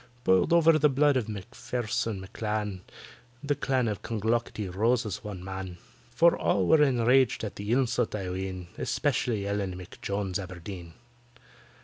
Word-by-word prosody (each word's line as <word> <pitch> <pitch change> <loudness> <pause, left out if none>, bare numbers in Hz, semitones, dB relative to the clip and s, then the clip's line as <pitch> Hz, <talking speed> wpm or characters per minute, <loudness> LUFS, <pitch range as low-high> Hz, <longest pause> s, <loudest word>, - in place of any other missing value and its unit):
Boiled 95 - +3
over 165 -2 +5
the 150 - +5
blood 145 +1 +3
of 125 -5 0
MACPHAIRSON 110 +1 -3
M'CLAN— 105 -1 -3 0.6
The 145 0 +1
Clan 130 -3 0
of 105 -3 -3
Clonglocketty 110 -1 -1
rose 115 +6 +1
as 105 -1 -5
one 100 -4 -7
man; 95 -1 -6 0.3
For 170 +1 +4
all 95 - +1
were 150 - +5
enraged 130 -3 +3
at 105 - -4
the 100 +2 -4
insult, 125 -3 +1
I 95 -3 -4
ween— 95 -1 -5
Especially 120 -7 0
ELLEN 100 -2 -2
M'JONES 95 +1 -4
ABERDEEN. 90 -2 -8
105 Hz, 140 wpm, -28 LUFS, 95-125 Hz, 0.6 s, over